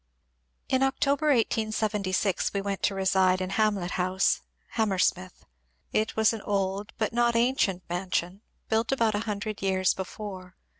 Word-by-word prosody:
Ik 260 - +1
October, 280 +2 +1
1876, 215 - +1
we 200 - +1
went 200 -1 -3
to 195 - +1
reside 190 -1 +3
in 185 0 -3
Hamlet 200 -3 +1
Honse, 185 +1 +1 0.3
Ham 220 -2 0
mersmith. 185 -1 -1 0.5
It 215 +1 0
was 220 0 +4
an 225 - -5
old 195 0 -2
bnt 220 0 -1
not 235 0 +2
ancient 230 -7 +1
mansion, 180 +1 -2 0.3
built 225 +2 +1
about 230 -5 +2
a 205 - 0
hundred 210 0 -4
years 190 -1 +2
before. 190 -1 -7
200 Hz, 145 wpm, -27 LUFS, 185-220 Hz, 0.5 s, was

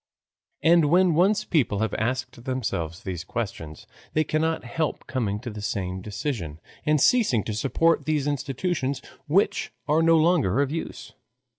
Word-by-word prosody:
And 165 -1 +5
when 175 +3 +4
once 190 +6 +3
people 135 - +1
have 110 +2 -1
asked 120 +1 -3
themselves 95 - -3
these 90 -3 -4
questions 95 -9 -5 0.3
they 155 - +3
cannot 160 +2 0
help 150 +6 -3
coming 110 -6 -2
to 110 -4 -6
some 95 -2 -3
decision 100 - -4 0.3
and 150 0 +4
ceasing 205 - +3
to 110 - -4
support 150 +9 +2
all - - -17
these 150 -3 0
institutions 140 0 -2 0.2
which 180 +7 +1 0.2
are 155 +2 +3
no 165 0 +5
longer 155 - +3
of 140 -1 +1
use. 165 +1 -6
135 Hz, 150 wpm, -25 LUFS, 105-160 Hz, 0.3 s, And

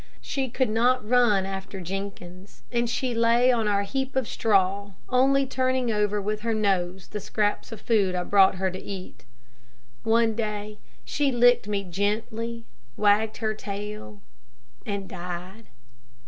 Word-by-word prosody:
She 265 -2 -3
could 250 -1 0
not 240 +1 +2
run 230 -5 +4
after 195 0 -6
Jenkins, 190 0 -7
and 240 -1 0
she 250 +1 -1
lay 235 +2 +4
on 230 -3 +1
our 200 -1 +2
heap 265 +5 -3
of 260 -3 +1
straw, 200 -1 +1 0.2
only 270 +2 +3
turning 255 -2 0
over 210 -1 +1
with 210 +1 -2
her 225 0 0
nose 190 -3 -1
the 210 - -4
scraps 210 +2 -1
of 225 - -7
food 200 -5 +2
I 180 - -1
brought 195 0 +5
her 190 0 -1
to 185 - -7
eat. 190 -8 -8 0.8
One 225 0 +3
day 210 -1 -4 0.3
she 285 -2 0
licked 245 -2 +4
me 205 -1 -1
gently, 220 +5 -2 0.3
wagged 215 +1 +3
her 220 -1 -1
tail, 200 - -7 0.6
and 200 -2 -3
died. 180 +4 -7
210 Hz, 145 wpm, -26 LUFS, 195-235 Hz, 0.8 s, brought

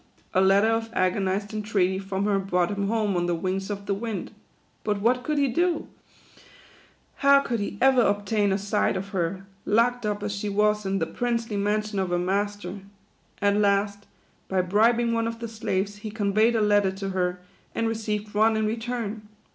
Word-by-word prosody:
A 185 - +4
letter 195 +3 +4
of 225 0 0
agonized 195 +1 0
entreaty 200 -3 0
from 195 0 -2
her 200 -1 +2
brought 180 -2 0
him 200 -1 -1
home 215 -2 0
on 175 0 0
the 175 - +1
wings 190 +3 -2
of 200 -1 -5
the 200 - 0
wind. 220 +1 -4 0.5
But 210 -1 0
what 245 +4 +2
could 305 -1 -1
he 280 -1 +3
do? 340 +6 0 1.3
How 280 0 +5
could 235 -4 -2
he 205 0 -4
ever 265 -1 +5
obtain 205 -1 +1
a 190 - +2
sight 205 -1 0
of 195 +1 -5
her, 185 0 -2 0.2
locked 240 +3 +2
up 210 -1 -2
as 205 0 -2
she 205 +1 -3
was 210 0 +1
in 195 0 0
the 165 - 0
princely 230 +4 -2
mansion 210 0 0
of 190 -1 -1
her 175 - +1
master? 200 +1 -2 0.6
At 200 0 +3
last, 200 0 +1 0.4
by 190 -1 +1
bribing 230 +5 +2
one 230 0 0
of 230 0 -4
the 230 0 -5
slaves, 205 -2 -2
he 215 +1 -6
conveyed 215 +2 +2
a 225 - +2
letter 205 -2 +3
to 195 0 -4
her, 180 -1 -1 0.4
and 230 - 0
received 215 -2 -3
one 220 +1 +3
in 220 - +1
return. 225 -1 -3
205 Hz, 185 wpm, -25 LUFS, 195-225 Hz, 1.3 s, How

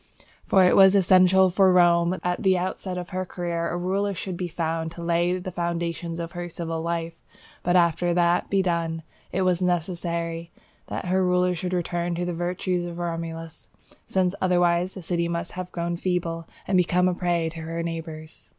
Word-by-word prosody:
For 190 -2 +5
it 180 - +4
was 195 0 +7
essential 185 0 +5
for 190 +1 +4
Rome 170 -1 +5
that 185 - -3
almost 180 0 0
at - - -8
the 190 -1 +4
outset 185 0 -3
of 180 -1 -5
her 185 -1 -2
career, 170 -2 -3
a 175 - -2
ruler 195 +3 -1
should 185 0 -4
be 180 0 -3
found 165 -1 -2
to 170 - -8
lay 170 +1 +1
the 185 0 -6
foundations 170 -1 -3
of 170 0 -4
her 175 -1 -5
civil 165 -1 -4
life; 170 0 -2 0.5
but, 175 +1 +1
after 175 0 +3
that 175 0 +3
had - - -28
been 195 -1 +2
done, 165 -2 -1 0.3
it 190 +1 0
was 180 -1 +1
necessary 170 -1 -2 0.4
that - - -4
her 185 +1 +2
rulers 180 -1 +2
should 180 +1 -3
return 175 -1 -1
to 175 +1 -2
the 175 - -2
virtues 175 +1 -1
of 170 -1 -7
Romulus, 165 -1 -5 0.4
since 185 -1 +1
otherwise 175 0 +2
the 190 - -8
city 170 0 -1
must 170 0 -3
have 180 0 -6
grown 170 0 -2
feeble, 170 -2 -2 0.2
and 190 - +2
become 180 0 +3
a 180 - +2
prey 175 -2 0
to 165 0 -9
her 165 +1 -4
neighbours. 160 -1 -7
175 Hz, 195 wpm, -25 LUFS, 170-180 Hz, 0.5 s, was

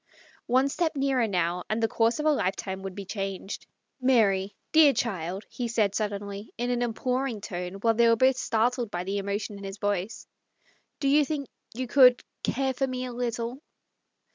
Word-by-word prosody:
One 260 +3 +3
step 320 +3 -1
nearer, 270 -4 +1
now, 180 -2 0
and 215 - 0
the - - +4
course 225 +1 +1
of 300 - -2
a 310 - +5
life 200 -10 +1
time 190 -1 -5
would 190 -1 -6
be 200 - -6
changed. 195 0 -5 0.2
" - - -45
Mary, 205 -6 +3 0.2
dear 310 -3 +7
child,' 190 -4 -2
1 - - -32
he 245 - -3
said 220 -4 +1
suddenly, 205 0 -4
in 245 +2 -1
an 245 -1 0
imploring 250 +1 -1
tone, 180 -2 -5
while 225 +3 +2
they 235 +1 +4
were 230 - +5
both 260 +2 +3
startled 240 +1 0
by 175 -1 -3
the 200 +2 -2
loudness 200 +2 -3
of 200 - -9
his 195 0 -7
voice, 205 0 -2 0.4
" - - -38
do 275 - +1
you 295 +2 +5
think 280 -2 -3 0.3
you 255 +1 -3 0.4
— - - -52
care 265 +1 0
for 270 +1 0
me 255 0 -3
a 250 - -6
little 235 +2 -3
225 Hz, 200 wpm, -27 LUFS, 200-255 Hz, 0.4 s, dear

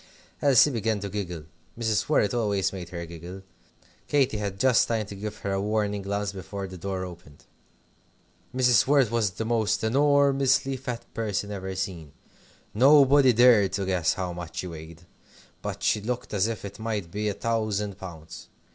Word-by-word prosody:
Elsie 140 +1 +5
began 110 -3 -1
to 100 0 -5
giggle. 90 -5 -5 0.3
Mrs. 115 0 0
Worrett 115 -9 +2
always 105 -6 0
made 90 -3 -7
her 85 -1 -6
giggle. 85 +3 -9 0.6
Katy 135 -6 +2
had 100 -2 -4
just 130 +1 +4
time 110 -2 -1
to 100 - -9
give 105 +1 -6
her 100 - -1
a 95 0 0
warning 105 -1 -1
glance 100 +1 -2
before 100 0 -6
the 95 -1 -9
door 95 +1 -4
opened. 85 -5 -13 1.1
Mrs. 125 -3 +3
Worrett 135 -5 +3
was 115 -3 +1
the 110 +4 -5
most 110 -2 0
enormously 135 +1 +3
fat 125 -2 -6
person 105 -2 -2
ever 95 -1 -5
seen. 90 -6 -5 0.6
Nobody 135 +2 +6
dared 115 -5 +5
to 100 -1 -1
guess 90 -3 +1
how 90 -2 -3
much 85 -1 -8
she - - -3
weighed, 80 0 -10 0.6
but - - -5
she 105 - +2
looked 120 +2 -4
as 100 +1 +2
if 115 -3 -5
it 100 - -9
might 105 -6 -3
be 105 +1 -2
a - - -2
thousand 105 -2 -2
pounds. 80 -4 -10
105 Hz, 170 wpm, -26 LUFS, 95-115 Hz, 1.1 s, Nobody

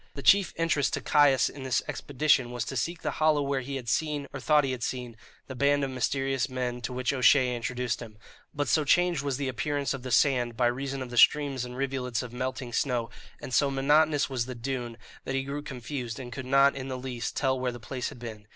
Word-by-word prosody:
The 140 - -7
chief 200 +5 +5
interest 165 -4 +1
to - - -4
Caius 145 -3 +4
in 145 - -8
this 130 -2 0
expedition 145 -3 +1
was 120 0 -3
to 135 - -5
seek 170 +6 -2
the 150 - -1
hollow 155 -2 +4
where 140 -1 -1
he 135 +2 -5
had 125 -3 -6
seen, 145 +5 0
or 135 - -5
thought 150 +2 +4
he 135 - -1
had 125 -2 -4
seen, 125 -1 -4 0.3
the 130 - -7
band 140 +2 +2
of 135 - -2
mysterious 135 +1 -1
men 125 -1 -3
to 120 - -4
which 125 +1 -1
O'Shea 130 -1 +4
introduced 125 0 -2
him; 110 -2 -10 0.3
but 145 -1 -2
so 155 - +3
changed 175 +1 +3
was 140 -2 -2
the 140 -1 -2
appearance 140 +2 -1
of 135 - -6
the 130 - -6
sand 125 -3 +2
by 125 - +2
reason 135 +2 -1
of 125 - -9
the 120 - +1
streams 140 -4 +4
and 125 0 -8
rivulets 130 -3 -2
of 120 -1 -9
melting 130 -1 -4
snow, 120 -2 0 0.3
and 130 - -8
so 140 +2 +3
monotonous 145 +2 +3
was 130 -3 -2
the 125 - -6
dune, 120 -1 -4 0.3
that 135 - -3
he 135 - 0
grew 140 +2 -4
confused, 125 -4 -5
and 120 -2 -7
could 130 -1 -6
not 135 +1 +5
in 135 -1 -5
the 130 -1 -4
least 125 -2 -5
tell 130 -2 +1
where 125 -1 -1
the 120 - -9
place 125 +3 -4
had - - -11
been. 110 -3 -9
130 Hz, 235 wpm, -28 LUFS, 125-140 Hz, 0.3 s, chief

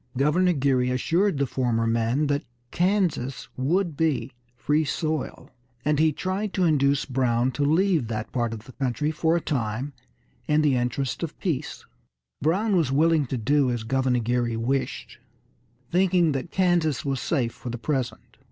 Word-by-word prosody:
Governor 175 +7 +3
Geary 130 -3 +1
assured 165 +8 +1
the 140 - +1
former 120 -3 0
men 115 +5 +1
that 145 0 0 0.3
Kansas 175 -8 0
would 165 +5 0
be 155 -3 0 0.2
free 145 +7 +1
soil, 155 0 -3 0.3
and 150 -1 +2
he 160 0 +4
tried 190 +6 -3
to 190 - +1
induce 140 -4 +2
Brown 125 -1 +1
to 145 +3 -2
leave 160 - +2
that 110 -1 -4
part 120 -3 -1
of 110 -2 -7
the 130 - -12
country 135 +3 -1
for 160 +1 +1
a 170 - 0
time 125 0 -2 0.5
in 150 0 +3
the 145 -3 +3
interest 125 +2 -1
of 165 -2 -4
peace. 155 -6 -3 0.6
Brown 195 +8 +1
was 160 -7 +2
willing 155 0 +3
to 130 - -2
do 135 +4 +2
as 120 -2 -2
Governor 130 +1 +1
Geary 120 0 0
wished, 130 +4 -2 0.7
thinking 180 -2 +3
that 135 +3 -3
Kansas 175 -8 +1
was 135 -2 -1
safe 125 -8 0
for 125 - -8
the 120 - -4
present. 130 0 -3
140 Hz, 160 wpm, -25 LUFS, 125-160 Hz, 0.7 s, he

